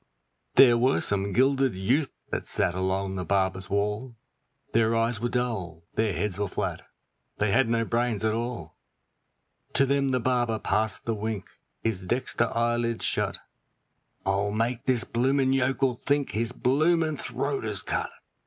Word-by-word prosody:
There 120 Hz, -3 st, +7 dB
were 130 Hz, +3 st, +3 dB
some 100 Hz, 0 st, 0 dB
gilded 135 Hz, +1 st, +2 dB
youths 130 Hz, +10 st, +1 dB, 0.2 s
that -, -, -3 dB
sat 85 Hz, -, +1 dB
along 95 Hz, +1 st, -1 dB
the 90 Hz, -1 st, -3 dB
barber's 95 Hz, 0 st, 0 dB
wall, 105 Hz, +5 st, -1 dB, 0.6 s
Their 115 Hz, 0 st, +3 dB
eyes 115 Hz, 0 st, +1 dB
were 120 Hz, +2 st, -1 dB
dull, 105 Hz, -10 st, -2 dB
their 110 Hz, -1 st, +1 dB
heads 100 Hz, +1 st, -2 dB
were 105 Hz, -, 0 dB
flat, -, -, -3 dB, 0.6 s
they 105 Hz, -1 st, +1 dB
had 120 Hz, +2 st, +3 dB
no 115 Hz, 0 st, +1 dB
brains 115 Hz, -2 st, 0 dB
at 110 Hz, -, +2 dB
all; 120 Hz, +2 st, -5 dB, 0.9 s
To 135 Hz, -, +4 dB
them 140 Hz, 0 st, +1 dB
the 130 Hz, -1 st, +1 dB
barber 120 Hz, -2 st, +1 dB
passed 105 Hz, -1 st, -1 dB
the 115 Hz, -, 0 dB
wink, 110 Hz, -2 st, -4 dB, 0.3 s
his 100 Hz, -5 st, -1 dB
dexter 120 Hz, +1 st, 0 dB
eyelid 120 Hz, 0 st, 0 dB
shut, -, -, 0 dB, 0.9 s
'I'll 100 Hz, +1 st, +1 dB
make 115 Hz, +3 st, -1 dB
this 125 Hz, -3 st, +3 dB
bloomin' 130 Hz, +2 st, +1 dB
yokel 135 Hz, -1 st, +1 dB
think 145 Hz, -1 st, +1 dB
his 115 Hz, +2 st, -1 dB
bloomin' 155 Hz, +5 st, +2 dB
throat 135 Hz, +2 st, -2 dB
is 105 Hz, -3 st, -2 dB
cut.' -, -, -2 dB
115 Hz, 155 wpm, -27 LUFS, 105-130 Hz, 0.9 s, There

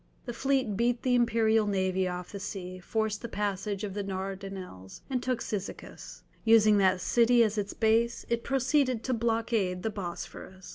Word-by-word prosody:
The 240 Hz, -, -4 dB
fleet 265 Hz, -4 st, 0 dB
beat 240 Hz, +3 st, 0 dB
the 255 Hz, -, +2 dB
imperial 225 Hz, -2 st, +3 dB
navy 190 Hz, -1 st, +1 dB
off 180 Hz, 0 st, -5 dB
the 200 Hz, -, -6 dB
sea, 185 Hz, -2 st, -6 dB
forced 220 Hz, +2 st, -2 dB
the 235 Hz, -, -6 dB
passage 200 Hz, -1 st, -2 dB
of 200 Hz, -2 st, -4 dB
the 205 Hz, -, -3 dB
Dardanelles, 190 Hz, -, -6 dB
and 255 Hz, -2 st, 0 dB
took 255 Hz, -2 st, -1 dB
Cyzicus. 200 Hz, -2 st, -7 dB, 0.2 s
Using 215 Hz, -2 st, +6 dB
that 190 Hz, -1 st, +3 dB
city 235 Hz, +4 st, +4 dB
as 215 Hz, -1 st, 0 dB
its 205 Hz, -2 st, -2 dB
base, 230 Hz, +1 st, +2 dB
it 235 Hz, 0 st, -1 dB
proceeded 260 Hz, -2 st, +1 dB
to 260 Hz, -, -1 dB
blockade 225 Hz, -5 st, 0 dB
the 220 Hz, -, -1 dB
Bosphorus. 190 Hz, 0 st, -7 dB
215 Hz, 165 wpm, -29 LUFS, 190-235 Hz, 0.2 s, Using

